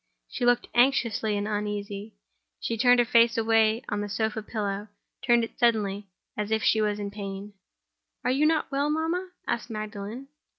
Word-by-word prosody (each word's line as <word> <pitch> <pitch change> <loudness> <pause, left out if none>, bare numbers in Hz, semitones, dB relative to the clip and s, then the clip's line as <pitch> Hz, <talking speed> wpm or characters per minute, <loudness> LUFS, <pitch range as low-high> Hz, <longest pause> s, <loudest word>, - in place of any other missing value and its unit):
She 245 - -3
looked 245 0 +3
anxious 240 -3 +3
and 205 -1 0
uneasy; 205 0 -4 0.4
she 230 - -2
turned 245 +2 +5
her 240 - +4
face 235 0 +4
away 225 0 +3
on 205 -1 -2
the 205 - -4
sofa 220 +1 -1
pillow—turned 210 +3 -2
it 230 - -7
suddenly, 210 -4 +1 0.3
as 210 0 -3
if 220 0 0
she 220 - +3
was 210 -1 0
in 205 -1 -4
pain. 200 0 -7 0.7
"Are - - +2
you 285 +4 +3
not 315 -2 +1
well, 280 +2 +1
mamma?" 325 +4 -1 0.2
asked 240 +1 -2
Magdalen. 215 +4 -6
220 Hz, 165 wpm, -27 LUFS, 205-240 Hz, 0.7 s, turned